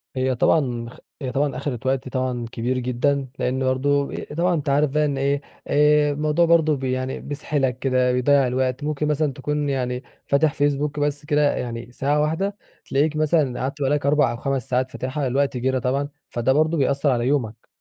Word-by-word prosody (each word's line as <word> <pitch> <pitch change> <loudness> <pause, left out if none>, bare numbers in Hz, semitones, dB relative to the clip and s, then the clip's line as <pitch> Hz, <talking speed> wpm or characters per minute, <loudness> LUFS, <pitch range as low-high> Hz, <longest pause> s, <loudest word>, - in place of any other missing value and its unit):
هي 130 0 0
طبعًا 120 -3 +1
خ - - -14 0.2
هي 130 -2 -3
طبعًا 140 0 0
أخدت 130 -4 -4
وقت 130 0 0
طبعًا 130 -2 -2
كبير 125 +3 -1
جدًا، 130 +2 0
لأن 130 +1 0
برضه 140 +2 +1 0.3
طبعًا 175 +1 +2
أنتَ 150 -3 -1
عارف 145 +1 +2
بقى 150 +1 +2
إن 140 -2 -1
إيه 140 +1 0 0.3
آآ 150 0 +4
الموضوع 150 +3 +2
برضه 160 -2 +4
ب 135 - -9
يعني 130 0 -2
بيسحلك 140 -3 -2
كده، 130 -1 +2
بيضيع 135 +1 +3
الوقت 130 +2 -1
ممكن 150 0 -1
مثلًا 150 -2 0
تكون 145 +2 -2
يعني 125 -1 -2 0.2
فاتح 145 +1 +3
فيسبوك 145 +1 0
بس 145 0 -1
كده 150 -1 +2
يعني 120 0 -5
ساعة 145 +4 0
واحدة 190 +7 -1 0.3
تلاقيك 150 +3 +1
مثلًا 155 -5 +1
قعدت 140 +3 -3
بقى 135 - +2
لَك 145 -1 0
4 145 -3 +3
أو 120 - -5
5 135 -1 -2
ساعات 130 0 0
فاتحها 130 +2 -3
الوقت 135 +1 0
جرى 130 +1 0
طبعًا، 135 +3 -1 0.2
فده 120 +2 +1
برضه 155 +3 +2
بيأثر 140 +1 +1
على 120 0 0
يومك. 115 -6 -1
140 Hz, 190 wpm, -23 LUFS, 130-150 Hz, 0.3 s, آآ